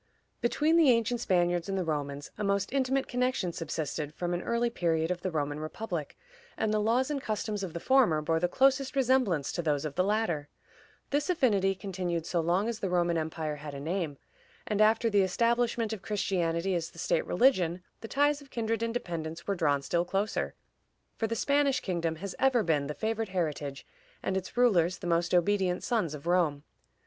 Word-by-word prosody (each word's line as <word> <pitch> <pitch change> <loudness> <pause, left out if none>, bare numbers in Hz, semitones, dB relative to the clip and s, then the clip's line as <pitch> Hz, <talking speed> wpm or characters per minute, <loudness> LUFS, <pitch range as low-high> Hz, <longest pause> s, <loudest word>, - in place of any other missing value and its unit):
Between 300 +7 +2
the 320 -5 +6
ancient 235 0 +2
Spaniards 175 -3 +1
and 195 - -1
the 185 - 0
Romans 145 -3 -3
a - - -4
most 200 +2 0
intimate 270 0 +1
connection 250 -8 0
subsisted 155 -2 -4
from 175 0 -2
an 175 - -1
early 235 +2 0
period 165 -4 0
of 180 -1 -3
the 185 - -1
Roman 145 -3 -2
republic, 155 -1 -5 0.4
and 215 -1 0
the 215 - +2
laws 245 +6 +2
and 280 -2 -2
customs 215 -2 -2
of 185 -4 -5
the 170 - -4
former 245 -9 +4
bore 160 +2 0
the 175 - +2
closest 270 +6 +2
resemblance 250 - +2
to 175 - -2
those 150 -3 0
of 150 - -3
the 180 - +2
latter. 185 -8 0 0.6
This 290 +4 0
affinity 205 - +2
continued 180 -4 -3
so 175 - 0
long 175 +6 +1
as 230 -2 -3
the 195 - -2
Roman 175 -1 +2
empire 155 -1 -2
had 145 -1 -7
a - - -5
name, 160 -1 -2 0.5
and 210 -1 0
after 225 +2 +4
the 205 -3 +4
establishment 230 +3 +1
of 210 - -6
Christianity 190 -3 0
as 170 -2 -1
the 170 - -19
state 180 +2 0
religion, 180 -6 +2 0.2
the 225 - -7
ties 290 +3 +2
of 280 - -15
kindred 230 -2 -2
and 230 0 -2
dependence 165 -7 -4
were 200 - 0
drawn 145 -6 +1
still 170 +5 +1
closer, 195 +4 -2 0.6
for 225 - -1
the 230 - -2
Spanish 280 +2 +2
kingdom 170 -3 -2
has 190 +4 -6
ever 260 -4 +3
been 150 -4 +1
the 150 - -4
favored 225 -1 -2
heritage, 150 -6 -3 0.4
and 190 - -1
its 190 +4 -4
rulers 185 -8 +3
the - - -9
most 170 0 +1
obedient 180 0 +2
sons 210 - 0
of 145 - -11
Rome. 170 -5 +1
185 Hz, 195 wpm, -29 LUFS, 165-230 Hz, 0.6 s, the